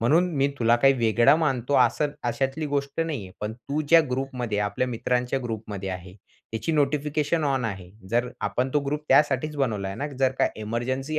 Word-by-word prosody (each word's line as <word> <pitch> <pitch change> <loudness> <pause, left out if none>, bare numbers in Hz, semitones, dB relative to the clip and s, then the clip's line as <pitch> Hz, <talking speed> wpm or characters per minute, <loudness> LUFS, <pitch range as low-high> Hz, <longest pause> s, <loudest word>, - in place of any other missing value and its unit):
म्हणून 160 +10 +3
मी 140 +1 +3
तुला 115 0 +4
काही 135 +3 +5
वेगळं 120 +3 +4
मानतो, 135 -4 0
असं 150 -1 -1
अशातली 135 +5 -1
गोष्ट 140 +1 -2
नाही 155 -9 -2
आहे, 95 - -14
पण 105 +1 -3
तू 140 +6 -4
ज्या 165 +1 +8
ग्रुपमध्ये 125 -5 -2
आपल्या 105 +5 0
मित्रांच्या 125 +2 -1
ग्रुपमध्ये 105 -4 -5
आहे, 90 0 -7 0.4
त्याची 115 +9 -2
नोटिफिकेशन 150 +1 +1
ऑन 135 -3 0
आहे. 95 -5 -5 0.2
जर 120 +1 +1
आपण 125 +2 -1
तो 150 - +4
ग्रुप 150 +2 -2
त्यासाठीच 145 +2 +3
बनवलाय 105 -8 -1
ना, 145 - -3
जर 135 -1 +3
काही - - 0
इमर्जन्सी 130 +7 -2
130 Hz, 175 wpm, -25 LUFS, 115-145 Hz, 0.4 s, ज्या